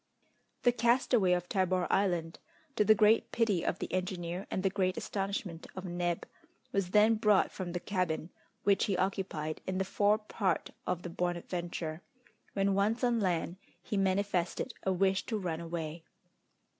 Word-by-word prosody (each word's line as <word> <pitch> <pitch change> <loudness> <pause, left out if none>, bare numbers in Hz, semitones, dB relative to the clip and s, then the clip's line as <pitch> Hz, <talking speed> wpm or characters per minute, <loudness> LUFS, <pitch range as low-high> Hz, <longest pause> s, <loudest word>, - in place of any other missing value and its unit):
The 245 - +6
castaway 235 -4 +3
of 180 0 -1
Tabor 185 -1 +1
Island, 175 -4 +1 0.4
to - - +4
the 215 +1 +6
great 215 +1 +4
pity 210 -7 +1
of - - 0
the - - -5
engineer 180 0 -2
and 185 - -2
the 195 - +3
great 185 -2 0
astonishment 195 -4 -3
of 190 0 -6
Neb, 175 -1 -2 0.5
was 195 -5 0
then 210 +3 +5
brought 210 -2 +3
from 180 -3 -5
the 175 - -1
cabin 180 -3 -2 0.3
which 200 -1 +3
he 195 -3 0
occupied 180 -5 -2
in 185 0 -1
the 190 - 0
fore 205 +2 +3
part 205 -5 -1 0.2
of 180 -1 -1
the 175 - -5
Bonadventure; 175 -2 -3 0.5
when 195 0 +2
once 210 +5 +1
on 240 -2 +3
land 175 -3 0 0.3
he - - -3
manifested 195 +2 0
a 190 - 0
wish 190 +1 +2
to 225 - -1
run 175 -5 -3
away. 165 -1 -4
185 Hz, 160 wpm, -32 LUFS, 175-205 Hz, 0.5 s, The